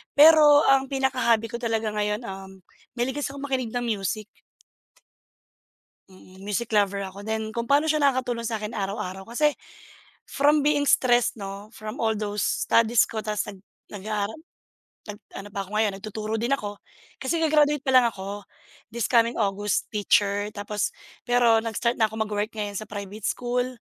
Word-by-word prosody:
pero 300 -1 +8
ang 270 0 +4
pinaka-hobby 255 -4 +1
ko - - -4
talaga 225 -2 -1
ngayon, 210 +2 -1
um, 190 0 -9 0.4
mahilig 255 +4 -1
kasi 275 - -3
akong 280 - -7
makinig 255 -4 -2
ng 245 - 0
music. 215 0 -2 1.8
Mm, 185 0 -17
music 210 +3 -3
lover 200 -1 +2
ako, 190 +1 -8
then 220 +1 -3
kung 235 +1 -4
paano 285 +2 +4
siya 310 -1 +1
nakakatulong 255 -4 +1
sa 225 - -2
akin 210 +1 -5
araw-araw 195 -1 -4
kasi 295 +5 +2 0.7
from 290 +1 +2
being 290 -1 +2
stressed, 245 -3 +3
'no, 200 -1 -7
from 215 +5 -7
all 220 -1 +1
those 210 -1 -2 0.2
studies 230 -1 +4
ko 220 - -4
tapos 210 -1 -2
nag 200 - -13 0.3
nag-aaral 210 +3 -4 0.7
nag 205 - -9 0.2
ano 195 +1 -7
pa 195 -1 -4
ako 190 - -17
ngayon 215 -1 +2
nagtuturo 215 +1 -5
din 240 +5 +1
ako. 205 -5 -6 0.4
Kasi 325 +5 -1
ga-graduate 295 -2 +3
pa 265 - 0
lang 255 -2 +6
ako 200 -1 -5 0.5
this 235 -2 -1
coming 235 -1 +4
August, 205 -1 -1
teacher 205 -1 +2
tapos, 205 0 -3 0.3
pero 240 -2 +4
nag-start 230 +2 -1
na 220 - +4
ako 215 - -11
mag-work 210 +1 -3
ngayon 205 -2 -3
sa 215 - -7
private 205 0 -6
school, 245 0 -1
220 Hz, 165 wpm, -25 LUFS, 205-250 Hz, 1.8 s, pero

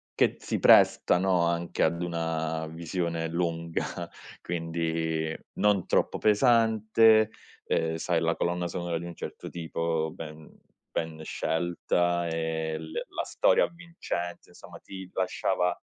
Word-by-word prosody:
che - - +3
si - - -2
presta, - - +6
no, 95 -1 +2
anche 85 0 -1
ad 85 +1 +1
una 80 -2 -2
visione 85 0 -3
lunga, 85 0 -2 0.6
quindi, 80 -1 -2 0.2
non 105 -3 +2
troppo - - +1
pesante, 110 -1 +4 0.3
ehm, 80 0 0
sai, 80 +1 0
la 85 0 +1
colonna 85 0 -1
sonora 85 -1 -3
di 85 - -7
un 85 - -7
certo - - -7
tipo, 80 -1 -2
ben 80 -2 -9 0.4
ben 80 -1 -3
scelta 85 +2 0
e 80 -1 -2
l 80 0 -9
la - - -4
storia - - +3
avvincente. 170 - -5
Insomma, - - -13
ti 95 -1 -10
lasciava, 90 -1 0
85 Hz, 125 wpm, -28 LUFS, 80-90 Hz, 0.6 s, presta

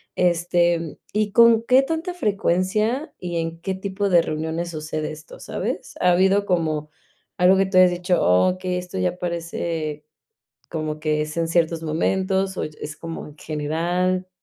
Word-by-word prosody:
este 175 -2 +1 0.2
¿y 210 -1 0
con 230 0 +6
qué 255 +3 +4
tanta 325 +4 -3
frecuencia 210 - 0
y 175 -1 -4
en 165 0 -3
qué 190 0 -2
tipo 200 +1 -2
de 175 -2 +5
reuniones 160 +2 -3
sucede 155 0 -4
esto, 155 0 -11
sabes? - - -4
Ha 180 - +4
habido 190 +3 +3
como 155 -4 0 0.5
algo 180 +2 +5
que 190 0 +2
tú 185 -1 0
hayas 185 -1 +7
dicho: 180 0 0
"Oh 90 - +4
okey, 185 -1 -3
esto 180 - -6
ya 90 - 0
parece 165 -3 -3 0.6
como 155 -1 -3
que 155 0 0
es 155 +1 -6
en 165 -1 +1
ciertos 165 -1 +1
momentos" 190 +4 0
o - - -1
y - - -5
es 155 +1 -6
como 165 -1 -7
en 150 0 -13
general. 175 +5 -1
175 Hz, 165 wpm, -23 LUFS, 160-190 Hz, 0.6 s, hayas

